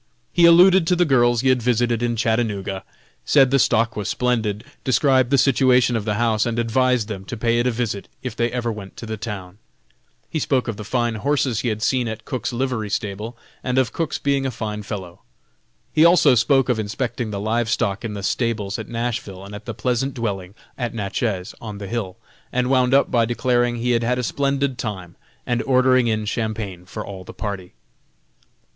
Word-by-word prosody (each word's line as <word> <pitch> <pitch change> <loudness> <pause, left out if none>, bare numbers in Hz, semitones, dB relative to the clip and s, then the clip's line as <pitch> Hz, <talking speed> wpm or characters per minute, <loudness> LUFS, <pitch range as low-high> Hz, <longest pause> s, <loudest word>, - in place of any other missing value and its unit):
He 170 -1 +6
alluded 180 +1 +6
to 180 - +3
the 175 0 +3
girls 120 -5 +3
he 130 - +2
had 130 -1 +3
visited 120 -1 +1
in 120 -1 0
Chattanooga, 110 -4 -1 0.4
said 135 -3 +4
the 135 - +4
stock 115 -2 +2
was 105 -1 -3
splendid, 110 -4 0 0.2
described 130 -1 +3
the 140 - +3
situation 125 -2 +4
of 110 -2 -2
the 105 -1 0
house 115 0 +1
and 115 -1 -2
advised 120 0 +2
them 100 -4 -6
to 120 - -6
pay 115 +1 +1
it 120 - +1
a - - +2
visit 110 -4 -3 0.2
if 130 -3 -4
they 120 0 0
ever 120 -2 -1
went 100 -3 -9
to - - -7
the 110 0 -4
town. 100 -3 -7 0.7
He 155 - -3
spoke 130 -3 0
of 115 -3 -3
the 105 - -6
fine 120 +2 0
horses 135 -5 +1
he 120 - -2
had 110 -1 -3
seen 125 -1 +1
at 110 0 -6
Cook's 130 - -3
livery 120 -3 -2
stable 105 +3 -4 0.3
and 125 0 -1
of 130 -2 +2
Cook's 165 -2 -2
being 140 -1 0
a 135 - 0
fine 110 -3 -4
fellow. 95 -4 -7 0.7
He 155 - +5
also 170 -5 +6
spoke 135 +3 +3
of 125 -3 +1
inspecting 115 +2 -3
the 100 -2 -4
live 115 +2 0
stock 105 -3 0
in 110 -3 -4
the 100 - -6
stables 105 -3 -1
at - - -7
Nashville 115 -5 -4
and 100 - -10
at 105 +1 -8
the 115 - -5
pleasant 130 +4 -1
dwelling 100 -5 -4 0.2
at 120 -2 -3
Natchez, 100 -2 -2
on 105 -3 -7
the 100 - -7
hill, 105 -4 -4 0.3
and 125 +1 0
wound 130 0 +4
up 140 - +3
by 115 -2 +3
declaring 120 0 +1
he 120 +1 -1
had 115 -1 +2
had 125 +2 0
a 125 - -2
splendid 140 0 -1
time, 95 -7 -5 0.3
and 120 -2 0
ordering 130 -1 +3
in 110 -1 0
Champagne 105 -5 -3
for 95 - -6
all 95 -2 -8
the - - -11
party. 100 -4 -5
120 Hz, 205 wpm, -22 LUFS, 105-125 Hz, 0.7 s, He